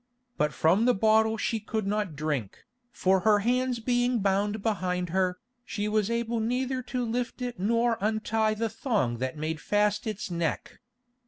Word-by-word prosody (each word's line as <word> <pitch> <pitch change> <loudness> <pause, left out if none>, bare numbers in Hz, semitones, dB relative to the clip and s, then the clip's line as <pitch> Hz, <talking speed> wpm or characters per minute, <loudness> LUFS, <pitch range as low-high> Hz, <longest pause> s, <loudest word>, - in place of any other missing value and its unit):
But 150 0 +1
from 180 +10 +3
the 250 - +4
bottle 220 +2 +3
she 225 0 -1
could 215 0 -3
not 205 -5 -1
drink, 140 -9 -3 0.3
for 190 -3 +2
her 210 +3 +4
hands 250 0 +1
being 245 +1 +1
bound 205 +1 0
behind 180 -5 -1
her, 185 0 +1 0.3
she 210 -3 -3
was 210 -1 +1
able 235 0 -1
neither 255 +3 -1
to 250 0 -3
lift 240 +3 -3
it 245 -3 -4
nor 230 +3 +2
to 205 - 0
untie 220 0 0
the 225 +1 -1
thong 210 - -1
that 130 +3 -3
made 155 +1 -3
fast 210 +1 +1
its 210 -3 -4
neck. 170 -2 -3
215 Hz, 170 wpm, -28 LUFS, 185-235 Hz, 0.3 s, the